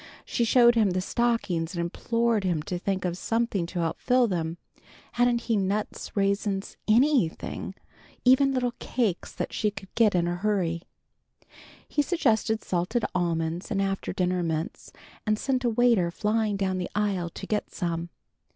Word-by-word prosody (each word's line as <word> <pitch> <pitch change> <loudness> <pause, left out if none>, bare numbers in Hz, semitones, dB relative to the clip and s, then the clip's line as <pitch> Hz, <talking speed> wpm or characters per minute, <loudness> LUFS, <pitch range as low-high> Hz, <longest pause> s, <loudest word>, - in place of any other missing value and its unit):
She 240 - 0
showed 240 +1 +6
him 220 -4 +3
the 185 0 0
stockings 190 -5 0
and 170 - -1
implored 230 +5 0
him 170 -5 0
to 175 +2 -4
think 190 0 -2
of 175 -1 -1
something 225 -6 0
to 175 0 -3
help 165 -1 -2
fill 250 -1 +3
them. 170 -5 -2 0.5
Hadn't 245 -1 +2
he 230 -1 0
nuts, 205 +2 -2
raisins, 200 0 0
anything, 240 - +1 0.5
even 265 +2 +6
little 250 -2 0
cakes, 220 -8 -1
that - - -4
she 215 - +1
could 200 -2 -11
get 220 -4 +4
in 175 -1 +2
a 175 0 -1
hurry? 180 -4 0 1.1
He 295 - +1
suggested 225 - +1
salted 185 +6 -1
almonds 170 -1 -1
and 200 - -1
after 195 0 -1
dinner 180 0 0
mints, 160 -1 -3 0.4
and 215 0 +2
sent 260 +1 -1
a 240 - +3
waiter 230 -6 +3
flying 210 +2 0
down 190 -1 -1
the 180 - -3
aisle 200 -5 0
to - - -8
get 210 -1 -2
some. 170 -2 -3
200 Hz, 160 wpm, -27 LUFS, 175-235 Hz, 1.1 s, showed